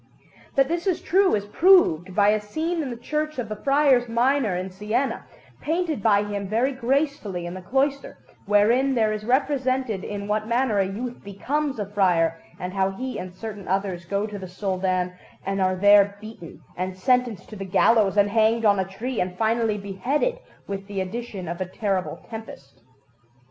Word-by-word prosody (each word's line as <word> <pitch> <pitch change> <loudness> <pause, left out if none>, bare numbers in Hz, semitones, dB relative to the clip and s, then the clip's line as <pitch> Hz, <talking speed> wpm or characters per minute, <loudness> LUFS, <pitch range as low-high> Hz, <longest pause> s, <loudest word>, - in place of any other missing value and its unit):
That 275 -1 +4
this 340 +5 -2
is 370 - +1
true 380 - +3
is 205 -1 -2
proved 205 - +4
by 205 0 +5
a 215 0 +2
scene 320 +11 -2
in 280 - -3
the 240 - -6
Church 305 +5 -3
of 235 -4 -3
the 215 - -3
Friars 275 0 +3
Minor 240 -3 +2
in 185 +1 -4
Siena, 210 +8 -2 0.3
painted 320 - -1
by 205 -1 +4
him 205 -1 -4
very 230 +7 +1
gracefully 255 - -1
in 175 - -5
the 185 - -7
cloister, 270 +7 -1 0.3
wherein 235 +7 +3
there 220 -2 +2
is 215 0 -5
represented 260 -4 0
in 200 -1 -5
what 215 +1 -1
manner 235 -3 +1
a 195 - +2
youth 235 +5 -6
becomes 270 +8 -2
a 210 - -2
friar, 175 -5 +1 0.2
and 180 0 -5
how 195 -1 +1
he 255 +7 -5
and 180 0 -7
certain 210 -3 -7
others 190 -2 -1
go 200 +4 -1
to 210 -1 -6
the 190 - -7
Soldan, 185 -1 -1 0.3
and 195 0 -1
are 185 0 +2
there 200 +1 +5
beaten 215 -6 -11
and 185 +1 -4
sentenced 240 -2 +1
to 215 - -9
the 195 - -6
gallows 200 +1 +3
and 205 0 +4
hanged 225 +1 +3
on 200 -2 +4
a 190 - +1
tree, 225 +6 -4
and 180 0 -3
finally 225 0 +1
beheaded, 245 - -1 0.3
with 195 0 -6
the 200 -2 -4
addition 195 -1 -5
of 170 +2 -5
a 185 - -2
terrible 195 -1 -3
tempest. 220 -12 -10
210 Hz, 185 wpm, -24 LUFS, 190-255 Hz, 0.3 s, by